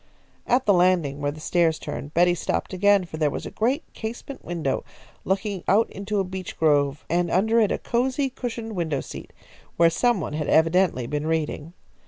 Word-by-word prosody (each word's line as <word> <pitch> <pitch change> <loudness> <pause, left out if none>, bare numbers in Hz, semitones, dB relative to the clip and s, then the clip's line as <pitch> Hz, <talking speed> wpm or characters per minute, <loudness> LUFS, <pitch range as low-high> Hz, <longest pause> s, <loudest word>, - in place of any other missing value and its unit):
At 250 +2 +2
the 205 - +5
landing 175 -6 +2
where 145 - 0
the 155 - -10
stairs 165 0 +2
turned, 145 0 -7
Betty 175 +1 +5
stopped 175 - -2
again, 200 0 +3
for 160 - -8
there 155 -2 +2
was - - -5
a - - -6
great 255 +8 0
casement 240 +5 -7
window 165 -6 -2 0.4
looking 190 -1 -1
out 215 +4 +3
into 200 +1 -3
a - - +2
beech 185 0 -7
grove, 145 -2 +2
and 175 +1 +1
under 220 +6 +3
it 215 -3 +3
a - - 0
cosy 260 +3 0
cushioned 230 -4 -5
window 160 -6 -1
seat, - - -9 0.5
where 165 0 +5
some 240 +4 +2
one 155 - -4
had 150 -1 -2
evidently 165 -5 +3
been 150 +4 -3
reading. 160 0 -2
180 Hz, 190 wpm, -24 LUFS, 155-210 Hz, 0.5 s, the